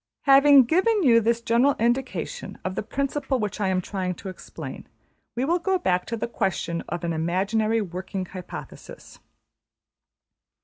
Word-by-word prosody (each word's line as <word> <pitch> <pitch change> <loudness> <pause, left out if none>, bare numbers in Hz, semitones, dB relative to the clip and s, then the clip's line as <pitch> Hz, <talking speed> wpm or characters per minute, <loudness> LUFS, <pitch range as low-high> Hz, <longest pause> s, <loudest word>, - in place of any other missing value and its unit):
Having 275 0 +7
given 380 - +2
you 230 -5 +6
this 230 +1 +1
general 240 +5 +3
indication 260 - -2
of 185 - -2
the - - -2
principle 275 +4 -2
which 210 -2 -3
I 200 - +1
am 185 -1 +1
trying 185 -1 -3
to 195 - -8
explain, 185 - -9 0.5
we 250 +2 0
will 345 +4 +1
go 380 +2 +1
back 180 - 0
to 230 - -3
the 220 - -2
question 175 -6 -2
of 175 - -4
an 170 -1 -1
imaginary 200 +7 0
working 185 0 -5
hypothesis. 180 -1 -10
225 Hz, 150 wpm, -25 LUFS, 185-270 Hz, 0.5 s, Having